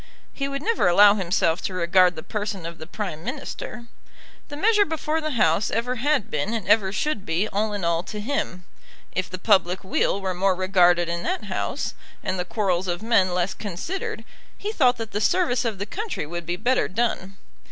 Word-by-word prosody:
He 275 - -2
would 275 0 -4
never 460 - +2
allow 200 +3 +7
himself 175 -3 +1
to 185 - -4
regard 180 0 +4
the 160 - -7
person 205 -4 -4
of 170 0 -7
the 160 - -8
Prime 175 -5 -5
Minister. 245 -1 -6 0.6
The 290 - -7
measure 420 +4 +4
before 320 -1 -2
the 305 -5 -2
House 165 0 +3
ever 245 +3 -1
had 280 -2 +1
been 155 +10 -1
and 220 -5 -4
ever 195 -4 +4
should 215 0 -1
be 170 +5 0
all 210 +1 -1
in 205 -4 -3
all 170 0 +1
to 210 - -6
him. 205 -6 -3 0.5
If 185 0 -2
the 185 - -5
public 185 -2 +2
weal 190 +1 +1
were 190 -1 -2
more 185 +1 +2
regarded 180 -2 +3
in 170 0 -2
that 370 - -2
House, - - -3 0.3
and 185 - -2
the 180 - -1
quarrels 185 -3 0
of 175 +3 -2
men 220 -5 +3
less 180 +1 0
considered, 215 - -5 0.3
he 415 - -3
thought 255 - +3
that 225 -1 -6
the 210 - -2
service 255 - +2
of 220 -4 -1
the 200 - -3
country 405 - -4
would 170 +1 -6
be 175 - -1
better 245 +7 +1
done. 195 -2 -2
200 Hz, 200 wpm, -24 LUFS, 180-245 Hz, 0.6 s, allow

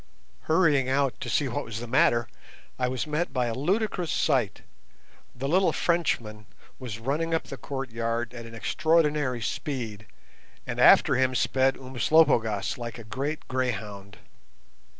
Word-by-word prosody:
Hurrying 155 -6 +3
out 135 -1 +1
to 125 - -5
see 140 +3 +1
what 120 - -3
was 115 -1 -6
the 120 - -6
matter, 120 -1 +3 0.5
I 125 - +1
was 125 -1 -2
met 155 +3 -2
by 125 -2 0
a 115 - -2
ludicrous 180 - -1
sight. 130 -9 0 0.7
The 135 +3 -4
little 180 +3 +3
Frenchman 115 - -1 0.3
was 120 -5 -6
running 150 +8 -1
up 160 - -1
the - - -8
courtyard 120 -3 -3
at 115 -1 -8
an 115 - -10
extraordinary 150 -2 +1
speed, 115 - -4 0.6
and - - -5
after - - +6
him 130 0 +1
sped 135 +2 +2
Umslopogaas 130 -5 +2
like 120 -1 -6
a 115 - -9
great 135 +8 -4
greyhound. 105 -6 -3
130 Hz, 145 wpm, -27 LUFS, 115-150 Hz, 0.7 s, after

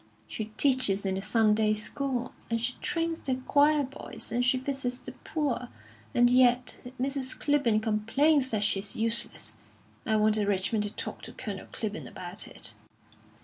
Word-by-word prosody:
She 220 - -4
teaches 255 -8 +3
in 190 - +1
the 190 - -2
Sunday 215 0 +3
School, 250 +3 -3 0.2
and 230 0 0
she 245 +2 -2
trains 330 -1 -1
the 260 - -1
choir 290 +3 +3
boys, 270 -3 -7
and 245 +2 +1
she 260 +1 +3
visits 260 -1 -1
the - - -7
poor; 280 -6 -2 0.5
and 245 0 +6
yet 250 0 +4 0.2
Mrs. 265 0 0
Clibborn 275 -7 +2
complains 260 +7 +3
that 215 -3 0
she's 200 -1 0
useless. 230 +1 -1 0.5
I 220 - +1
wanted 215 -1 +3
Richmond 205 +2 +1
to - - -3
talk - - -6
to - - -8
Colonel 205 -6 -6
Clibborn 215 -1 -4
about 180 +4 -4
it." - - -2
240 Hz, 155 wpm, -29 LUFS, 215-265 Hz, 0.5 s, and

